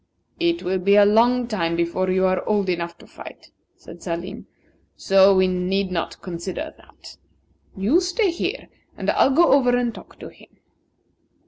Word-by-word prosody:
"It 340 Hz, 0 st, 0 dB
will 185 Hz, +1 st, -1 dB
be 200 Hz, +3 st, +3 dB
a 205 Hz, 0 st, +6 dB
long 235 Hz, +4 st, +3 dB
time 170 Hz, -7 st, -2 dB
before 170 Hz, +2 st, -1 dB
you 185 Hz, 0 st, +1 dB
are 185 Hz, 0 st, 0 dB
old 205 Hz, -3 st, 0 dB
enough 170 Hz, -1 st, -3 dB
to -, -, -17 dB
fight," -, -, -13 dB, 0.2 s
said 170 Hz, +1 st, -14 dB
Salim; 180 Hz, +5 st, -6 dB, 0.5 s
"so 195 Hz, 0 st, +4 dB
we 185 Hz, 0 st, +3 dB
need 185 Hz, +1 st, -1 dB
not 170 Hz, -2 st, -4 dB
consider 185 Hz, -, -6 dB
that. -, -, -17 dB, 0.6 s
You 220 Hz, -, +2 dB
stay 370 Hz, +2 st, 0 dB
here, 340 Hz, -, -4 dB, 0.3 s
and -, -, -1 dB
I'll -, -, +3 dB
go 330 Hz, +5 st, +3 dB
over 250 Hz, -3 st, +3 dB
and 240 Hz, -2 st, -1 dB
talk -, -, -14 dB
to -, -, -8 dB
him." -, -, -19 dB
195 Hz, 165 wpm, -22 LUFS, 180-245 Hz, 0.6 s, a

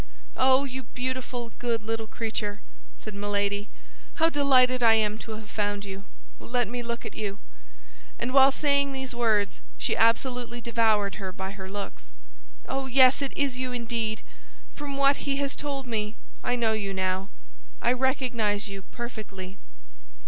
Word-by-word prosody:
"Oh, 260 Hz, +1 st, +5 dB
you 265 Hz, -1 st, -4 dB
beautiful, 250 Hz, -1 st, -4 dB
good 230 Hz, -2 st, 0 dB
little 225 Hz, 0 st, -2 dB
creature!" 215 Hz, -2 st, -3 dB, 0.4 s
said 215 Hz, -, -7 dB
Milady. 205 Hz, 0 st, -1 dB, 0.5 s
"How 325 Hz, 0 st, +4 dB
delighted 255 Hz, -3 st, +4 dB
I 230 Hz, -1 st, +7 dB
am 215 Hz, -1 st, +1 dB
to 225 Hz, -, -6 dB
have 215 Hz, 0 st, -8 dB
found 205 Hz, -1 st, -1 dB
you! 195 Hz, 0 st, -7 dB, 0.3 s
Let 245 Hz, -1 st, 0 dB
me 245 Hz, +3 st, -3 dB
look 235 Hz, 0 st, -4 dB
at -, -, -5 dB
you!" 205 Hz, -2 st, -3 dB, 0.8 s
and 255 Hz, -, -2 dB
while 270 Hz, 0 st, +8 dB
saying 280 Hz, -1 st, +2 dB
these 265 Hz, -1 st, -4 dB
words, 220 Hz, -4 st, +2 dB, 0.2 s
she -, -, 0 dB
absolutely 240 Hz, +1 st, +2 dB
devoured 220 Hz, -4 st, +2 dB
her 190 Hz, -1 st, -3 dB
by 190 Hz, +1 st, -5 dB
her 190 Hz, -2 st, -7 dB
looks. 195 Hz, -, -6 dB, 0.6 s
"Oh, 270 Hz, 0 st, -2 dB
yes 260 Hz, +1 st, +6 dB
it 275 Hz, -, -1 dB
is 275 Hz, -3 st, 0 dB
you 255 Hz, -1 st, -2 dB
indeed! 230 Hz, -2 st, -1 dB, 0.5 s
From 285 Hz, -2 st, -5 dB
what 275 Hz, 0 st, +5 dB
he 275 Hz, -, +2 dB
has 280 Hz, 0 st, -1 dB
told 280 Hz, -2 st, -3 dB
me, 215 Hz, -3 st, -2 dB, 0.3 s
I 245 Hz, -, +1 dB
know 230 Hz, -2 st, +2 dB
you 200 Hz, -3 st, -2 dB
now. 190 Hz, +1 st, 0 dB, 0.5 s
I 235 Hz, -, +3 dB
recognize 245 Hz, -6 st, +1 dB
you 195 Hz, -1 st, -6 dB
perfectly." 200 Hz, -5 st, -7 dB
230 Hz, 155 wpm, -27 LUFS, 205-260 Hz, 0.8 s, while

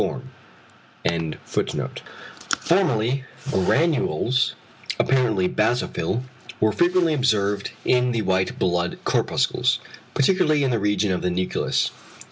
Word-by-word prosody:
Formerly 135 Hz, -, +2 dB, 0.3 s
granules, 125 Hz, -, +1 dB, 0.4 s
apparently 115 Hz, -8 st, +2 dB
basophil, 110 Hz, 0 st, 0 dB, 0.4 s
were 110 Hz, 0 st, +3 dB
frequently 175 Hz, -, +2 dB
observed 105 Hz, -7 st, +1 dB, 0.2 s
in 125 Hz, 0 st, +3 dB
the 115 Hz, -2 st, -1 dB
white 95 Hz, -1 st, 0 dB
blood 90 Hz, -1 st, 0 dB
corpuscles, -, -, +1 dB, 0.4 s
particularly 155 Hz, -1 st, +3 dB
in 135 Hz, -, +1 dB
the 115 Hz, -, +1 dB
region 105 Hz, 0 st, +1 dB
of 90 Hz, -, -1 dB
the 90 Hz, -, 0 dB
nucleus. 90 Hz, +1 st, 0 dB
115 Hz, 95 wpm, -23 LUFS, 95-135 Hz, 0.4 s, were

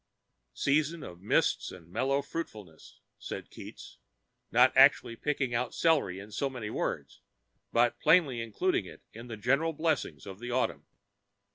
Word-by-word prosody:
"Season 155 Hz, +3 st, +1 dB
of 85 Hz, 0 st, -10 dB
mists 100 Hz, -, +1 dB
and 90 Hz, -3 st, -12 dB
mellow 135 Hz, +10 st, 0 dB
fruitfulness," 105 Hz, -, -8 dB, 0.2 s
said -, -, -7 dB
Keats, -, -, -11 dB, 0.5 s
not -, -, +5 dB
actually 115 Hz, -, +5 dB
picking 135 Hz, -1 st, -2 dB
out 120 Hz, +1 st, -1 dB
celery 150 Hz, -, +2 dB
in 100 Hz, +2 st, -10 dB
so 135 Hz, +7 st, -1 dB
many 120 Hz, -5 st, -6 dB
words, -, -, -4 dB, 0.5 s
but 120 Hz, +1 st, +2 dB
plainly 140 Hz, -9 st, +4 dB
including 115 Hz, -, 0 dB
it -, -, -12 dB
in 115 Hz, +2 st, -10 dB
the 115 Hz, -2 st, -7 dB
general 140 Hz, +9 st, +1 dB
blessings 160 Hz, +1 st, -1 dB
of 95 Hz, -1 st, -9 dB
the 120 Hz, +1 st, -6 dB
autumn. 125 Hz, +1 st, -1 dB
120 Hz, 145 wpm, -30 LUFS, 105-150 Hz, 0.5 s, not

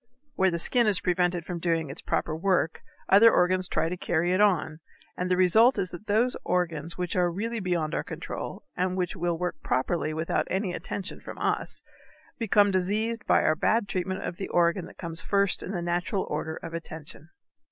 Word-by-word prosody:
Where 190 Hz, 0 st, +3 dB
the 170 Hz, -, -1 dB
skin 235 Hz, +7 st, +3 dB
is 200 Hz, -3 st, +3 dB
prevented 175 Hz, -1 st, 0 dB
from 175 Hz, -1 st, -4 dB
doing 165 Hz, -4 st, 0 dB
its 150 Hz, -, -8 dB
proper 155 Hz, -, -1 dB
work 175 Hz, -2 st, +1 dB, 0.3 s
other 220 Hz, +4 st, +7 dB
organs 185 Hz, +1 st, +2 dB
try -, -, 0 dB
to 175 Hz, -, -2 dB
carry 175 Hz, 0 st, 0 dB
it 185 Hz, -, +2 dB
on, 165 Hz, -6 st, +2 dB, 0.4 s
and 180 Hz, 0 st, -2 dB
the 180 Hz, -, +2 dB
result 220 Hz, +8 st, +5 dB
is 185 Hz, -, -2 dB
that 175 Hz, +5 st, -10 dB
those 225 Hz, +5 st, +2 dB
organs 170 Hz, -3 st, -1 dB
which 180 Hz, -1 st, -2 dB
are 180 Hz, -1 st, +3 dB
really 225 Hz, +6 st, -3 dB
beyond 175 Hz, -5 st, -1 dB
our -, -, -1 dB
control, -, -, -6 dB
and 185 Hz, +1 st, -1 dB
which 180 Hz, -2 st, -1 dB
will 170 Hz, 0 st, -1 dB
work 180 Hz, -2 st, -3 dB
properly 155 Hz, +4 st, 0 dB
without 160 Hz, +1 st, -1 dB
any 190 Hz, -1 st, -1 dB
attention 195 Hz, +2 st, -5 dB
from -, -, -9 dB
us, -, -, -1 dB, 0.6 s
become 205 Hz, -3 st, +4 dB
diseased 215 Hz, +5 st, -1 dB
by -, -, +4 dB
our 155 Hz, -, +4 dB
bad 220 Hz, +5 st, +1 dB
treatment 185 Hz, 0 st, -2 dB
of 170 Hz, -, -4 dB
the 195 Hz, -, -4 dB
organ 170 Hz, +1 st, +2 dB
that -, -, -15 dB
comes 165 Hz, -1 st, -5 dB
first 200 Hz, 0 st, +1 dB
in -, -, -6 dB
the 180 Hz, -3 st, -3 dB
natural 175 Hz, +3 st, -1 dB
order 160 Hz, +1 st, -3 dB
of 165 Hz, -, -8 dB
attention. 160 Hz, -1 st, -8 dB
180 Hz, 195 wpm, -27 LUFS, 170-195 Hz, 0.6 s, other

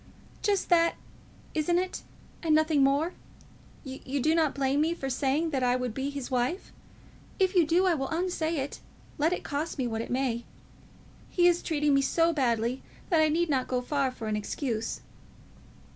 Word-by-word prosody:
"Just 405 Hz, -2 st, 0 dB
that; 335 Hz, -1 st, +4 dB, 0.6 s
isn't 320 Hz, +3 st, +1 dB
it? 365 Hz, +1 st, -2 dB, 0.4 s
and 315 Hz, -2 st, +3 dB
nothing 310 Hz, -2 st, +3 dB
more. 285 Hz, +6 st, +2 dB, 0.7 s
You 270 Hz, 0 st, -4 dB
do 310 Hz, +5 st, +2 dB
not 320 Hz, -3 st, +2 dB
blame 275 Hz, +1 st, +1 dB
me 330 Hz, +2 st, +1 dB
for 270 Hz, -5 st, -4 dB
saying 290 Hz, +5 st, 0 dB
that 270 Hz, -3 st, 0 dB
I 250 Hz, 0 st, +3 dB
would 250 Hz, -3 st, -2 dB
be 270 Hz, +3 st, -2 dB
his 280 Hz, -3 st, -6 dB
wife? 255 Hz, +9 st, -1 dB, 0.6 s
If 380 Hz, -1 st, +2 dB
you 350 Hz, -5 st, +4 dB
do, 350 Hz, +4 st, +3 dB
I 365 Hz, -, +4 dB
will 270 Hz, -4 st, -2 dB
unsay 335 Hz, -1 st, -1 dB
it, 275 Hz, 0 st, -4 dB, 0.4 s
let 310 Hz, +3 st, +3 dB
it 360 Hz, -, -2 dB
cost 300 Hz, +3 st, -3 dB
me 260 Hz, -, -1 dB
what 225 Hz, -2 st, -2 dB
it -, -, -6 dB
may. 245 Hz, -2 st, -1 dB, 0.9 s
He 350 Hz, -, +2 dB
is 350 Hz, 0 st, +4 dB
treating 295 Hz, -3 st, +1 dB
me 275 Hz, -, +4 dB
so 330 Hz, +4 st, +2 dB
badly 240 Hz, -3 st, 0 dB, 0.3 s
that 325 Hz, -2 st, +5 dB
I 310 Hz, -, +4 dB
need 340 Hz, +3 st, +1 dB
not 260 Hz, -2 st, +1 dB
go 255 Hz, -, 0 dB
far 275 Hz, +1 st, 0 dB
for 235 Hz, -3 st, -7 dB
an 215 Hz, -, 0 dB
excuse." 225 Hz, +1 st, -3 dB
290 Hz, 185 wpm, -28 LUFS, 260-335 Hz, 0.9 s, that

